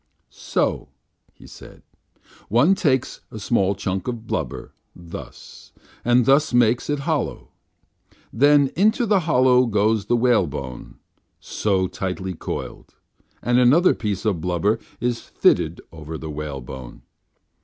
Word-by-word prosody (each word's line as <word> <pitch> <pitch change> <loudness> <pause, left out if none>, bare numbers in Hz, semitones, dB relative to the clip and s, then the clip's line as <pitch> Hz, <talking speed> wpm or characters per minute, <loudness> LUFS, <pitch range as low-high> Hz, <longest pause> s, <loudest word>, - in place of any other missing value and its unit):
"So," - - -2 0.4
he - - -18
said, - - -14 0.7
"one 125 - +4
takes 135 -9 0
a - - -9
small 100 -2 +1
chunk 95 0 -3
of 120 -2 -4
blubber, 80 - -4 0.2
thus, 85 -1 -11 0.3
and 120 0 +3
thus 140 +1 +3
makes 120 +2 +2
it 145 -1 -1
hollow. 155 +1 -3 0.8
Then 145 +2 +4
into 215 +7 +2
the 205 -3 +3
hollow 125 -2 +4
goes 105 0 +1
the 120 - +2
whalebone, 75 - -1 0.4
so, 95 -3 -1
tightly 95 0 -4
coiled, 80 - -7 0.5
and 120 +1 +3
another 145 +9 +5
piece 105 -2 -4
of 95 -7 0
blubber 90 +6 0 0.2
is 120 0 -1
fitted - - +1
over 80 0 -8
the 80 0 -7
whale 75 -2 -5
bone. 60 -1 -10
110 Hz, 125 wpm, -22 LUFS, 90-125 Hz, 0.8 s, another